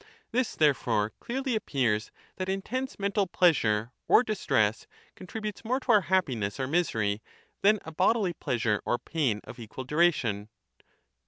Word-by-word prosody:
This 250 Hz, 0 st, 0 dB
therefore 130 Hz, -8 st, +2 dB
clearly 260 Hz, 0 st, -2 dB
ap 215 Hz, -, -3 dB
pears, 115 Hz, -6 st, 0 dB, 0.3 s
that 185 Hz, 0 st, -3 dB
intense 250 Hz, +7 st, -3 dB
mental 200 Hz, 0 st, 0 dB
pleasure 120 Hz, -12 st, +2 dB, 0.2 s
or 240 Hz, -, +6 dB
distress 135 Hz, -, 0 dB, 0.3 s
con 185 Hz, -, -11 dB
tributes 215 Hz, 0 st, -5 dB
more 250 Hz, +4 st, 0 dB
to 260 Hz, -, 0 dB
our 210 Hz, -2 st, +6 dB
happiness 135 Hz, -, 0 dB
or 130 Hz, -, 0 dB
misery 110 Hz, -10 st, 0 dB, 0.4 s
than 210 Hz, +2 st, +5 dB
a 160 Hz, -, -7 dB
bodily 185 Hz, +3 st, +2 dB
pleasure 115 Hz, -8 st, -1 dB
or 120 Hz, -, 0 dB
pain 130 Hz, -11 st, -1 dB
of -, -, -11 dB
equal 115 Hz, +3 st, -7 dB
duration. 130 Hz, -9 st, +1 dB
160 Hz, 150 wpm, -28 LUFS, -, 0.4 s, or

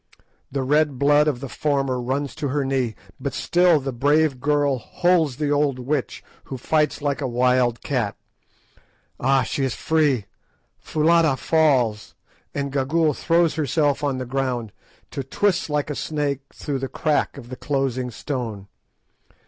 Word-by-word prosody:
The 135 Hz, 0 st, -1 dB
red 150 Hz, 0 st, +2 dB
blood 145 Hz, +2 st, +4 dB
of 135 Hz, -5 st, -1 dB
the 135 Hz, -, -4 dB
former 135 Hz, -2 st, -1 dB
runs 135 Hz, +3 st, -2 dB
to 145 Hz, -, -3 dB
her 140 Hz, +1 st, -1 dB
knee, 130 Hz, -4 st, -1 dB, 0.2 s
but -, -, -4 dB
still 175 Hz, -2 st, +3 dB
the 135 Hz, 0 st, -4 dB
brave 145 Hz, +2 st, +2 dB
girl 145 Hz, -2 st, +1 dB
holds 165 Hz, +3 st, +1 dB
the 145 Hz, +1 st, -1 dB
old 145 Hz, -2 st, +2 dB
witch, 130 Hz, +2 st, -3 dB, 0.2 s
who 130 Hz, -, -6 dB
fights 150 Hz, +3 st, 0 dB
like 145 Hz, 0 st, -1 dB
a 135 Hz, -, -1 dB
wild 125 Hz, -1 st, +2 dB
cat. 120 Hz, -8 st, -1 dB, 1.0 s
Ah! 135 Hz, +1 st, +3 dB
she 135 Hz, +4 st, -2 dB
is 130 Hz, -3 st, -1 dB
free! 150 Hz, -9 st, +1 dB, 0.5 s
Foulata 160 Hz, -2 st, +2 dB
falls, 130 Hz, -8 st, +1 dB, 0.4 s
and 140 Hz, -1 st, -2 dB
Gagool 150 Hz, +3 st, +2 dB
throws 165 Hz, +3 st, +2 dB
herself 150 Hz, -1 st, 0 dB
on 140 Hz, -2 st, 0 dB
the 130 Hz, -, -4 dB
ground, 125 Hz, -4 st, -2 dB, 0.4 s
to 140 Hz, -, -3 dB
twist 185 Hz, +7 st, 0 dB
like 150 Hz, 0 st, -1 dB
a -, -, -3 dB
snake 145 Hz, -3 st, -2 dB
through 140 Hz, -3 st, -4 dB
the 135 Hz, -, -3 dB
crack 150 Hz, -1 st, 0 dB
of 120 Hz, -3 st, -10 dB
the 130 Hz, -, -6 dB
closing 130 Hz, -3 st, -1 dB
stone. 115 Hz, -5 st, -5 dB
140 Hz, 155 wpm, -23 LUFS, 130-150 Hz, 1.0 s, blood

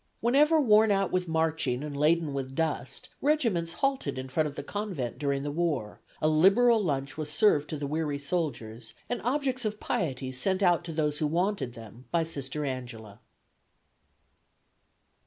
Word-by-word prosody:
Whenever 295 Hz, +7 st, +4 dB
worn 220 Hz, -5 st, +5 dB
out 195 Hz, -2 st, +1 dB
with 180 Hz, -1 st, 0 dB
marching 160 Hz, -5 st, 0 dB
and 150 Hz, -1 st, -5 dB
laden 155 Hz, +1 st, +2 dB
with 135 Hz, -1 st, -4 dB
dust, 140 Hz, -5 st, -2 dB
regiments 230 Hz, -, +1 dB
halted 270 Hz, -, -1 dB
in 130 Hz, 0 st, -5 dB
front 155 Hz, +4 st, +1 dB
of 145 Hz, -, -12 dB
the -, -, -5 dB
Convent 180 Hz, -, -4 dB
during 140 Hz, -1 st, -1 dB
the 145 Hz, -, -3 dB
war, 145 Hz, -10 st, -2 dB, 0.2 s
a -, -, +4 dB
liberal 200 Hz, +9 st, +5 dB
lunch 140 Hz, -3 st, -2 dB
was 150 Hz, -1 st, -3 dB
served 150 Hz, -3 st, +3 dB
to 155 Hz, -, -3 dB
the 145 Hz, -, -4 dB
weary 150 Hz, 0 st, -1 dB
soldiers, 120 Hz, -8 st, -3 dB
and 245 Hz, -, -2 dB
objects 260 Hz, 0 st, -1 dB
of 215 Hz, -1 st, -3 dB
piety 130 Hz, -6 st, -2 dB
sent 190 Hz, +10 st, 0 dB
out 175 Hz, -2 st, +4 dB
to 170 Hz, -, -5 dB
those 150 Hz, -2 st, -1 dB
who 155 Hz, -, +1 dB
wanted 170 Hz, -, -1 dB
them 115 Hz, +2 st, -12 dB
by 170 Hz, -1 st, +1 dB
Sister 150 Hz, -2 st, -4 dB
Angela." 120 Hz, -6 st, -6 dB
155 Hz, 165 wpm, -28 LUFS, 135-195 Hz, 0.2 s, worn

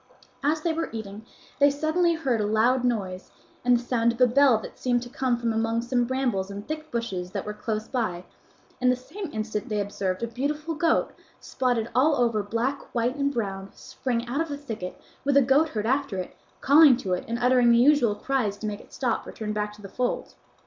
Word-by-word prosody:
As 305 Hz, +2 st, +1 dB
they 330 Hz, 0 st, 0 dB
were 325 Hz, +1 st, -2 dB
eating 220 Hz, 0 st, -7 dB, 0.3 s
they 285 Hz, 0 st, +6 dB
suddenly 315 Hz, +4 st, +1 dB
heard 260 Hz, -8 st, 0 dB
a 205 Hz, -, 0 dB
loud 235 Hz, +4 st, +2 dB
noise 195 Hz, -7 st, -2 dB, 0.3 s
and 245 Hz, 0 st, +5 dB
the 240 Hz, -, -6 dB
sound 235 Hz, -1 st, +2 dB
of 235 Hz, -, -9 dB
a 250 Hz, -, +7 dB
bell 255 Hz, 0 st, +5 dB
that 215 Hz, -, -9 dB
seemed 245 Hz, -1 st, +1 dB
to 245 Hz, -, -9 dB
come 255 Hz, -2 st, 0 dB
from 235 Hz, -1 st, -1 dB
among 225 Hz, +1 st, 0 dB
some 240 Hz, 0 st, +1 dB
brambles 240 Hz, -7 st, -1 dB
and 200 Hz, +1 st, -7 dB
thick 310 Hz, 0 st, -5 dB
bushes 195 Hz, -8 st, -3 dB
that 200 Hz, -, -3 dB
were 210 Hz, -, -4 dB
close 215 Hz, 0 st, -3 dB
by, 215 Hz, -9 st, -2 dB, 0.6 s
and 250 Hz, 0 st, +4 dB
the -, -, +2 dB
same 335 Hz, +8 st, -8 dB
instant 215 Hz, +2 st, -3 dB
they 210 Hz, -1 st, -1 dB
observed 200 Hz, 0 st, -2 dB
a -, -, 0 dB
beautiful 295 Hz, +7 st, -3 dB
goat, 325 Hz, +2 st, +1 dB, 0.3 s
spotted 245 Hz, -3 st, -1 dB
all 290 Hz, +4 st, +4 dB
over 235 Hz, -4 st, +1 dB
black, 230 Hz, +7 st, -2 dB
white, 240 Hz, +2 st, +1 dB
and 280 Hz, -1 st, 0 dB
brown, 195 Hz, -6 st, -3 dB
spring 240 Hz, -2 st, -3 dB
out 270 Hz, +6 st, -1 dB
of 330 Hz, -, -1 dB
the 285 Hz, -, -4 dB
thicket 225 Hz, -10 st, -6 dB, 0.2 s
with 280 Hz, 0 st, +3 dB
a -, -, +8 dB
goatherd 270 Hz, -5 st, +2 dB
after 265 Hz, -4 st, 0 dB
it, 185 Hz, -, -5 dB, 0.3 s
calling 285 Hz, -2 st, +7 dB
to 190 Hz, -7 st, -2 dB
it 180 Hz, -, -2 dB
and 235 Hz, -, -2 dB
uttering 245 Hz, 0 st, +4 dB
the 235 Hz, -, +5 dB
usual 245 Hz, -4 st, +4 dB
cries 215 Hz, -3 st, -1 dB
to 220 Hz, -, -7 dB
make 210 Hz, -1 st, -4 dB
it -, -, -20 dB
stop 245 Hz, -4 st, -2 dB
or -, -, -6 dB
turn 215 Hz, -1 st, -4 dB
back 210 Hz, 0 st, -2 dB
to 210 Hz, 0 st, -15 dB
the -, -, -6 dB
fold. 245 Hz, +5 st, -2 dB
240 Hz, 220 wpm, -26 LUFS, 215-275 Hz, 0.6 s, a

